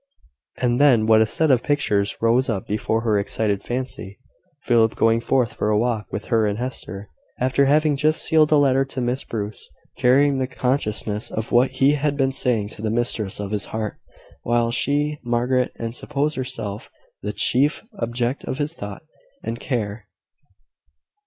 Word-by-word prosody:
And 125 +1 +1
then 125 -7 +5
what 110 0 +5
a 110 - +3
set 155 +7 +2
of 125 -2 +4
pictures 105 -9 0
rose 120 +4 +3
up 100 -5 -2
before 110 +2 -1
her 110 -3 +1
excited 100 0 -1
fancy! 120 -5 -5 0.5
Philip 115 -2 +3
going 115 0 +3
forth 120 0 +1
for 105 - -1
a 105 - +3
walk 115 -1 0
with 105 - -4
her 110 -2 +3
and 105 0 -2
Hester, 110 -5 -6 0.3
after 130 +2 +2
having 150 +1 +3
just 155 +3 +1
sealed 155 -1 +3
a - - +6
letter 135 -2 +3
to 135 -1 -6
Miss 125 +2 -1
Bruce, 105 -1 -6 0.3
carrying 135 +2 +4
the 130 - 0
consciousness 110 -5 -1
of 110 0 -4
what 125 +2 +4
he 135 +2 +3
had 145 0 0
been 135 -1 +2
saying 120 -6 +1
to 105 - -9
the 110 - -1
mistress 110 -4 -1
of 100 -1 -4
his 105 -1 -1
heart, 110 -1 -4 0.4
while 120 0 +1
she, 145 +4 0
Margaret, 125 +1 +1
had 115 0 -4
supposed 150 +4 -2
herself 125 -6 -5 0.3
the 105 - -3
chief 130 +8 +1 0.2
object 120 +3 -2
of - - -3
his 150 +1 -2
thought 100 -9 -8 0.4
and 115 +1 -4
care! 110 -4 -3
120 Hz, 170 wpm, -22 LUFS, 110-135 Hz, 0.5 s, a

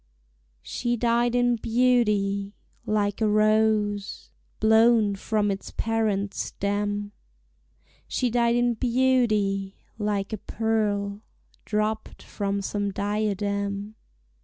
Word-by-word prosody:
She 240 -1 -2
died 235 +1 +1
in 245 -1 +2
beauty, 210 -4 +1 0.3
like 205 0 0
a 220 - +3
rose 215 -1 +1 0.3
Blown 220 -1 +4
from 205 +1 0
its 195 - -5
parent 215 -3 0
stem; 205 0 -2 1.0
She 250 -2 -1
died 235 0 +2
in 240 0 +2
beauty, 225 -6 +1 0.2
like 205 -1 -1
a 215 - -3
pearl 210 -2 -1 0.4
Dropped 215 +1 -2
from 200 -1 -3
some 205 0 -2
diadem. 200 0 -2
210 Hz, 95 wpm, -25 LUFS, 200-225 Hz, 1.0 s, Blown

